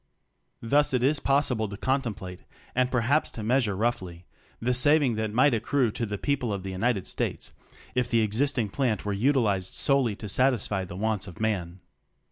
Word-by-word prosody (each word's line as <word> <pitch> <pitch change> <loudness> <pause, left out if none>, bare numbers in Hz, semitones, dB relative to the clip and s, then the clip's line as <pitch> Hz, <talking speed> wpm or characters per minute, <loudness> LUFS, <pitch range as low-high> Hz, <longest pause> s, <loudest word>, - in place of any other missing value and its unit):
Thus 140 +3 +2
it 125 - 0
is 145 +2 +2
possible 135 -7 +1
to 100 - -7
contemplate 110 -9 -2 0.2
— - - -28
and 125 0 +2
perhaps 130 +5 +1
to 110 - -7
meas 125 +2 +2
ure 100 - -2
roughly 95 -5 -2 0.2
— - - -33
the 125 +2 0
saving 140 0 +3
that 110 -1 -2
might 130 +5 +4
accrue 115 +2 +1
to 115 +1 -3
the 105 0 -3
people 135 -2 -1
of 100 -2 -3
the 95 - -5
United 100 +1 0
States - - -3 0.4
if 125 -1 0
the 115 -1 +3
existing 115 +1 0
plant 115 -3 -1
were 105 - -1
utilized 105 -5 +1
solely 135 -7 +2
to 105 - -8
satisfy 105 -4 +1
the 90 - -9
wants 105 0 -1
of 90 - -11
man. 95 -5 -2
115 Hz, 190 wpm, -27 LUFS, 100-130 Hz, 0.4 s, might